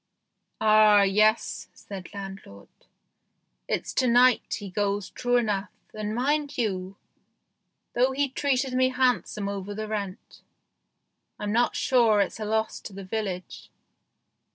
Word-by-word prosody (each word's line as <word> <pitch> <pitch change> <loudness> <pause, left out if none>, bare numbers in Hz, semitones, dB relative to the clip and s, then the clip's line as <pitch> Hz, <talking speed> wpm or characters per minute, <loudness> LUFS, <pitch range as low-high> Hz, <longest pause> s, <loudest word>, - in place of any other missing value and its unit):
" - - -52
Ah, 215 -1 +6
yes," 215 +3 +2
said 190 -3 -9
landlord, 195 - -9 0.5
" - - -50
it's - - -2
to 255 - +2
night 245 +1 +4
he 205 - -7
goes 200 +1 -2
true 245 -1 0
enough, 205 -4 -1 0.2
and, 215 0 -4
mind 290 +3 0
you, 195 -4 -2 1.0
though 255 +2 +3
he 280 +2 0
treated 265 -1 -1
me 255 0 +3
handsome 250 -5 0
over 200 0 -5
the 215 +1 -4
rent, 205 -1 -6 1.0
I'm 205 0 -3
not 240 +3 +2
sure 230 -5 +3
it's 200 - -1
a 215 - -3
loss 220 +1 -1
to 205 - -10
the 195 0 -8
village. 185 -2 -5
215 Hz, 135 wpm, -26 LUFS, 200-245 Hz, 1.0 s, Ah